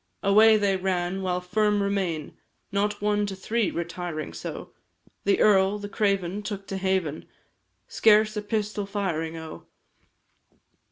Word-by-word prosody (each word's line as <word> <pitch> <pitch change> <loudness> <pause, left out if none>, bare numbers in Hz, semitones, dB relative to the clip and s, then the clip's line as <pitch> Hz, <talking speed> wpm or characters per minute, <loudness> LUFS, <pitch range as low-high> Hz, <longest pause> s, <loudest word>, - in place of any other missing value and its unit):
Away 215 +2 +6
they 200 -2 +1
ran, 185 0 -1
while 180 -1 -1
firm 205 +2 +1
remain, 190 -6 -2 0.4
Not 205 +1 -1
one 210 0 +1
to 195 - -5
three, 220 +3 -1
retiring 170 - -5
so, 85 - -7 0.5
The 200 - +3
earl, 195 -1 +4
the 205 0 -7
craven, 200 -2 0
took 205 -2 -6
to 195 - -3
haven, 190 -5 -1 0.6
Scarce 215 - +4
a 210 - -2
pistol 210 -1 -2
firing, 165 -6 -2
O! 160 -1 -9
195 Hz, 130 wpm, -26 LUFS, 180-210 Hz, 0.6 s, Away